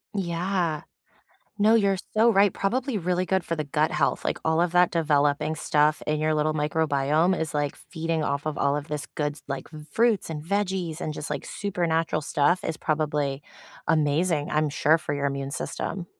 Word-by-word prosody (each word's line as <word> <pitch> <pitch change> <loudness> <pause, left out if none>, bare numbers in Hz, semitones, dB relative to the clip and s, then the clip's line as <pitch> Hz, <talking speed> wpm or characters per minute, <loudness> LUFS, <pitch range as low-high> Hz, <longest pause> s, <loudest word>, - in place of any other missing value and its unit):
Yeah. 175 -3 -1 0.8
No, 215 +2 +5
you're 200 -3 +3 0.2
so 225 +2 +5
right. 200 -1 +4
Probably 245 +3 -1
really 180 +1 0
good 190 0 0
for 165 - -2
the 155 - -2
gut 150 +2 0
health, - - 0
like, - - -1
all 160 +1 +2
of 175 -1 +1
that 180 0 +5
developing 150 -2 +1
stuff 150 0 +2
in 150 0 0
your 155 0 +1
little 155 0 +1
microbiome 155 +2 +1
is, 160 -2 -3
like, 145 -1 -1
feeding 165 -1 -3
off 140 0 -1
of 155 -2 -3
all 140 +1 +2
of 145 +1 -5
this 150 -1 -4
goods, 150 -1 -4
like 135 -1 -5 0.2
fruits 230 -4 +2
and 150 -2 -5
veggies 185 -3 -1
and 155 - -3
just, 150 - -6
like, 145 -2 -3
super 180 -4 -2
natural 160 -1 0
stuff 150 +4 +1
is 160 - -2
probably 150 -3 -1 0.5
amazing, 155 0 +1
I'm 155 0 +1
sure, 160 +1 +3
for 145 -2 -3
your 140 0 -1
immune 140 0 -3
system. 180 +4 -4
160 Hz, 185 wpm, -26 LUFS, 150-180 Hz, 0.8 s, No